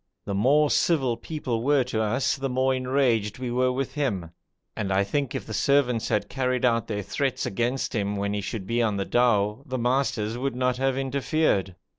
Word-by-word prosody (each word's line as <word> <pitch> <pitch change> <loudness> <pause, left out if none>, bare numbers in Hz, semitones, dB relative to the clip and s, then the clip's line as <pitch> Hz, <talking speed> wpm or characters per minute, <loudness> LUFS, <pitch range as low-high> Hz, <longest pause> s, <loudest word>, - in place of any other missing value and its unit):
The 100 - -3
more 140 +9 +3
civil 135 -8 +2
people 125 -5 -4
were 140 +1 +3
to 120 -3 -2
us 115 +5 +1
the 135 -1 -3
more 130 +1 +1
enraged 125 -5 +1
we 125 -1 -4
were 125 +1 +2
with 130 +1 -3
him, 100 - -2 0.4
and 100 -3 -2
I 95 +1 +3
think 140 +6 -2
if - - -4
the 110 - -7
servants 125 -3 +2
had 105 - 0
carried 130 -2 0
out 115 -3 +2
their 105 -2 -3
threats 130 +6 -1
against 120 +7 -1
him 105 -3 -1
when 100 0 -1
he 105 - -1
should 100 0 -5
be 115 +3 0
on 105 -3 +1
the 100 - -1
dhow, 105 -1 +2
the 130 -1 -2
masters 120 -3 0
would 135 0 -2
not 125 0 0
have 135 0 0
interfered. 135 - 0
125 Hz, 200 wpm, -26 LUFS, 105-135 Hz, 0.4 s, more